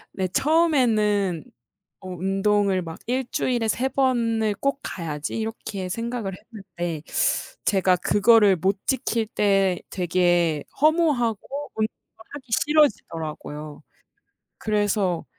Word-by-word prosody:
네 190 -1 -1
처음에는 215 - +2 0.6
어 185 - -9
운동을 195 +1 +1
막 165 0 -8
'1 255 +1 0
주일에 240 -3 0
3 250 +5 0
번을 230 -5 +1
꼭 275 0 0
가야지.' 155 -4 -5
이렇게 215 -4 -5
생각을 230 0 -3
했는데 175 -8 -6 0.6
제가 190 -2 +3
그거를 210 0 +4
못 190 +4 0
지킬 235 -4 0
때 195 -4 +2
되게 175 -4 +1 0.2
허무하고 290 - +1
운동을 215 0 +1 0.5
하기 285 -2 -8 0.2
싫어지더라고요. 160 - -1 0.8
그래서 205 -4 0
205 Hz, 225 characters per minute, -24 LUFS, 180-240 Hz, 0.8 s, 그거를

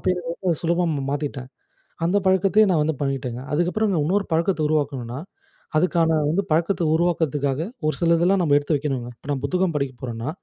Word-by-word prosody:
அப்ப - - -14
எனக்கு 175 -2 -6
ரொம்ப, 180 -3 -1
சுலபம் 170 0 +1
ம 135 - -3
மாத்திட்டேன். 140 -3 -4 0.6
அந்த 180 +4 +2
பழக்கத்தையே 190 +3 +4
நான் 160 -4 +3
வந்து 155 0 0
பழகிட்டேங்க. 130 -3 -2
அதுக்கப்றம் 185 +6 +1
நான், 155 -4 +1
இன்னொரு 195 +5 +1
பழக்கத்த 165 +1 +1
உருவாக்கணுன்னா, 135 -5 -1 0.6
அதுக்கான 165 -1 +2 0.2
வந்து 195 +5 +1
பழக்கத்த 170 +3 +1
உருவாக்குறதுக்காக, 155 -4 0 0.3
ஒரு 155 - 0
சிலதெல்லாம் 170 +3 +3
நம்ம 145 -4 +3
எடுத்து 145 +2 0
வைக்கணுங்க. 135 -4 -2
இப்ப - - -18
நான் 135 -2 -2
புத்தகம் 185 -2 0
படிக்க 140 -3 -1
போறேன்னா, 120 +1 -4
160 Hz, 175 wpm, -23 LUFS, 140-175 Hz, 0.6 s, பழக்கத்தையே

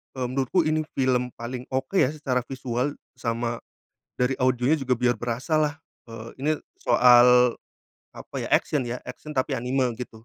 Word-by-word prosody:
eee, 125 -1 -2
menurutku 135 +7 +1
ini 155 0 +1
film 125 -2 +1
paling 125 +1 -5
oke, 135 +8 -2
ya, 135 -7 +4
secara 135 -5 -2
visual, 130 +1 -2 0.2
sama 115 0 -2 0.6
dari 125 +1 0
audionya 130 +4 +2
juga 130 -2 0
biar 120 -1 +1
berasalah, 145 +6 -1 0.3
eee, 115 0 -8
ini 150 - +1 0.3
soal, 125 - +6 0.6
apa - - -12
ya? - - -4
Action 150 -4 +2
ya? 120 +1 -3
Action 145 +4 -9
tapi 130 - 0
anime, 125 0 0
gitu. 115 -2 -9
125 Hz, 150 wpm, -25 LUFS, 120-135 Hz, 0.6 s, soal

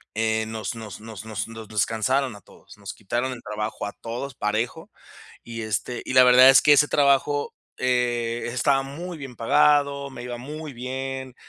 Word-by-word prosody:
eh, 110 0 0
nos 110 +1 -4
nos 110 -3 -8
nos 110 -2 -9
nos 110 +1 -6
descansaron 115 +4 0
a 105 - -13
todos, - - -18
nos 100 -1 -8
quitaron 120 +5 -3
el 125 - -10
trabajo 105 0 -4
a 100 - -5
todos, 125 +3 -5
parejo. 110 +3 -2 0.5
Y 115 -1 -7
este, 110 +3 -3
y - - -4
la 130 0 +8
verdad, 125 +1 +8
es 135 - +6
que 150 - +7
ese 150 +1 +5
trabajo, 145 0 +2 0.2
eh, 120 -2 0
estaba 135 +2 +2
muy 165 +6 -7
bien 135 -4 -8
pagado, 140 +2 +2
me 130 - -9
iba 120 0 -5
muy 150 +4 -7
bien, 130 +1 -5
125 Hz, 170 wpm, -24 LUFS, 110-135 Hz, 0.5 s, la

